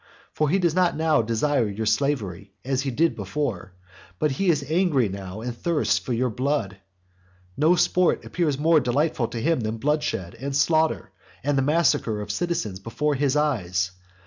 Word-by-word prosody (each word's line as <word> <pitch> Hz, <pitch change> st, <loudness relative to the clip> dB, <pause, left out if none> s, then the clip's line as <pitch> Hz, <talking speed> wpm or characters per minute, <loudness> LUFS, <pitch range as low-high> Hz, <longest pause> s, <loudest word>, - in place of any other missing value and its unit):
For 155 Hz, -1 st, +1 dB
he 185 Hz, -, +3 dB
does 175 Hz, -4 st, +1 dB
not 180 Hz, -3 st, +2 dB
now 160 Hz, -4 st, +3 dB
desire 115 Hz, +2 st, 0 dB
your 105 Hz, +2 st, -4 dB
slavery, 105 Hz, -7 st, -1 dB
as 135 Hz, 0 st, 0 dB
he 135 Hz, -, -2 dB
did 160 Hz, +7 st, +1 dB
before, 115 Hz, -11 st, -4 dB, 0.4 s
but 150 Hz, -, +1 dB
he 185 Hz, +8 st, 0 dB
is 150 Hz, -4 st, +1 dB
angry 155 Hz, -, +2 dB
now 95 Hz, +1 st, -7 dB
and 120 Hz, 0 st, -4 dB
thirsts 165 Hz, +4 st, +1 dB
for -, -, -7 dB
your 125 Hz, +1 st, 0 dB
blood. 115 Hz, -6 st, -1 dB, 0.8 s
No 160 Hz, +5 st, +4 dB
sport 180 Hz, 0 st, +2 dB
appears 155 Hz, -6 st, -1 dB
more 160 Hz, +2 st, +4 dB
delightful 135 Hz, -1 st, 0 dB
to 115 Hz, 0 st, -5 dB
him 165 Hz, +5 st, +1 dB
than 110 Hz, 0 st, -3 dB
bloodshed, 140 Hz, -, -1 dB
and 135 Hz, +1 st, -4 dB
slaughter, 160 Hz, +3 st, +1 dB, 0.3 s
and 145 Hz, +1 st, +1 dB
the 135 Hz, -, +2 dB
massacre 140 Hz, -7 st, +1 dB
of 105 Hz, 0 st, -4 dB
citizens 110 Hz, -, -2 dB
before 150 Hz, +8 st, -1 dB
his 140 Hz, 0 st, +1 dB
eyes. 95 Hz, -12 st, 0 dB
140 Hz, 175 wpm, -24 LUFS, 110-155 Hz, 0.8 s, No